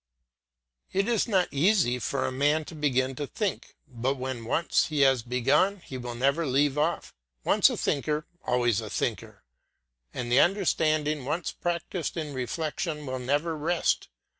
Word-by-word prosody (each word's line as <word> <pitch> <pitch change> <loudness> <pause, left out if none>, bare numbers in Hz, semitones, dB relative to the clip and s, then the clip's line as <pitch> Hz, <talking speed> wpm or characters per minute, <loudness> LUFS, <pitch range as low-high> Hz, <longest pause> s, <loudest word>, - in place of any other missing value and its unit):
It 195 +1 +1
is 235 -2 +1
not 190 -5 +2
easy 150 - +2
for 135 +2 -1
a - - -1
man 145 +4 +1
to - - -10
begin 135 -4 0
to 145 - -3
think; 210 - -3
but 130 +2 -2
when 130 -3 -5
once 165 +8 +1
he 150 -2 0
has 135 -3 +4
begun 135 - +2
he 135 - -9
will 120 -1 -5
never 140 +7 +1
leave 135 +2 +2
off. 155 +3 -1 0.3
Once - - +5
a - - -3
thinker, 150 +1 -1 0.2
always 120 -3 +1
a 110 - -7
thinker, - - -3 0.7
and 120 -1 -4
the 125 - +6
understanding 155 -6 +2
once 155 +6 -2
practised 175 -1 -3
in 150 -3 -4
reflection 150 +2 -3
will 130 -1 -3
never 145 +6 0
rest. 165 +3 0
145 Hz, 160 wpm, -27 LUFS, 130-165 Hz, 0.7 s, the